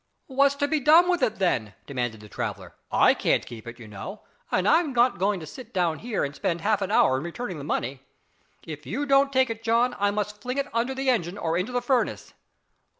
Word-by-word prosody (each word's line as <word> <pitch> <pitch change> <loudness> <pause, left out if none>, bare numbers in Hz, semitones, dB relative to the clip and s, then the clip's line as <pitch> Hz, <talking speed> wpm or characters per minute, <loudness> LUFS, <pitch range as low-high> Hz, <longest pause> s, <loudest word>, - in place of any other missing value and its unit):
"What's 275 +1 +2
to 285 0 0
be 310 +1 +1
done 315 +6 +6
with 350 -4 0
it, 225 -4 +1
then?" 120 - 0
demanded 120 -5 -3
the 105 - -12
traveller, - - -5 0.2
"I - - +5
can't - - +1
keep 115 -1 -10
it, 115 0 -8
you 115 -3 -11
know, 100 -2 -8 0.3
and 185 +1 +1
I'm 315 -1 +3
not 245 -4 +3
going 195 +1 +1
to - - -7
sit 250 - -11
down 170 -3 +1
here 230 -3 -2
and 140 - -3
spend 175 -5 -2
half 210 +1 +1
an 195 - -1
hour 130 -10 +4
in 135 - -4
returning 175 0 -5
the - - -7
money. 130 -2 -2 0.6
If 150 -2 -8
you 290 +2 -2
don't 275 0 +4
take 260 -2 +2
it 225 0 -6
John, 235 +2 +2
I 205 0 +3
must 210 0 -3
fling 250 +4 -4
it 280 0 -2
under 240 +3 0
the 265 0 +1
engine 190 -5 -1
or 165 -4 -1
into 185 +7 -1
the 245 0 -1
furnace." 250 0 0
210 Hz, 230 wpm, -26 LUFS, 160-260 Hz, 0.6 s, done